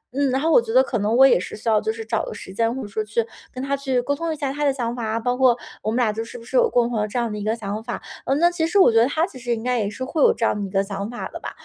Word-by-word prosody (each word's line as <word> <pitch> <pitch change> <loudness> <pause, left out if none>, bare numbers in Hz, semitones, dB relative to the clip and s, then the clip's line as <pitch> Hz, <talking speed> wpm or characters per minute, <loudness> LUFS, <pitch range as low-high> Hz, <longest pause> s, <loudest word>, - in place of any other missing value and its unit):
嗯， 280 -1 +2
然 260 - +1
后 320 +3 +1
我 245 - +6
觉 225 - -6
得 255 +3 +6
可 240 -4 -2
能 210 +3 +1
我 265 - +8
也 265 - +4
是 185 - -6
需 220 - -10
要 215 -1 +4
就 220 0 -1
是 225 0 -7
找 225 0 -1
个 - - -6
时 190 - -9
间， 230 +3 0
或 265 - -4
者 - - -6
说 215 +2 -3
去 215 +2 -1 0.3
跟 255 - -6
他 275 +1 0
去 270 -2 -1
沟 285 - 0
通 330 +3 -3
一 - - -2
下 275 -2 -2
他 295 - -3
的 285 - +4
想 240 -3 -3
法 240 - -5
啊， 220 +1 -1
包 245 +2 0
括 250 -2 +4 0.2
我 215 - -2
们 230 - -1
俩 225 -4 +2
就 225 +1 -3
是 230 - -11
是 - - -7
不 230 - -12
是 - - -7
有 485 -2 +5
共 240 - +2
同 235 -3 -2
的 210 - 0
这 215 - -5
样 235 -2 0
的 210 - -4
一 205 - -5
个 220 +2 0
想 215 0 -5
法。 240 +1 -4 0.3
呃， 270 - +2
那 345 +3 +4
其 325 -2 0
实 380 - 0
我 375 -11 +7
觉 225 - +4
得 235 - +4
他 315 +4 +1
其 260 - -11
实 240 -1 -1
应 225 - -7
该 250 -1 0
也 200 - -1
是 255 +5 -5
会 310 +3 -2
有 - - +7
这 230 - -1
样 - - +2
的 - - -3
一 - - -10
个 195 +1 +1
想 200 +1 -5
法 245 - -5
的 - - -6
吧。 - - -5
240 Hz, 420 characters per minute, -22 LUFS, 220-270 Hz, 0.3 s, 我